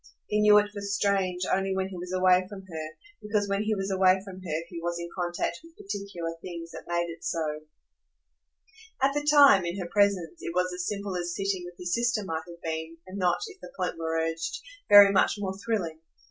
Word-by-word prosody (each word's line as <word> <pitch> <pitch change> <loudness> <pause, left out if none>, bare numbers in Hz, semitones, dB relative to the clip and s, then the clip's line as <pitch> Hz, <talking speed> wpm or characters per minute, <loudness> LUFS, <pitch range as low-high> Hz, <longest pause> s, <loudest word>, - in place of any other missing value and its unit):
He 210 0 0
knew 210 0 +7
it 205 0 +3
for 205 - -6
strange 200 -2 0
only 195 0 0
when 190 0 -1
he 190 - -8
was 180 +1 -6
away 185 0 +4
from 200 -2 -8
her, 160 -4 -6 0.3
because 210 -1 0
when 200 0 0
he 215 0 0
was 195 0 -3
away 190 0 +4
from 190 -2 -9
her 165 -3 -3
he 170 - -7
was 170 0 -2
in 170 0 -5
contact 175 -1 -2
with 330 0 -17
particular 195 -5 -5
things 170 -2 -7
that - - -10
made 170 0 0
it 165 - -21
so. 155 -2 -2 1.4
At 270 +1 +3
the 295 - 0
time, 285 -9 +7
in 170 +2 -3
her 185 - -3
presence, 190 -4 +1
it 170 - -5
was 180 0 +1
as 180 0 -3
simple 200 -2 -3
as 175 -1 -3
sitting 195 -2 -2
with 175 0 -11
his 180 -1 -3
sister 235 -1 +1
might 160 -3 -3
have 170 0 -12
been, 160 0 -4
and 190 +2 -7
not, 180 -2 +2
if 400 -3 -12
the - - -9
point 180 - -1
were 165 0 -1
urged, 165 - -3 0.3
very 205 -1 +10
much 195 - +3
more 190 -2 -3
thrilling. 185 -9 -2
185 Hz, 215 wpm, -28 LUFS, 170-200 Hz, 1.4 s, very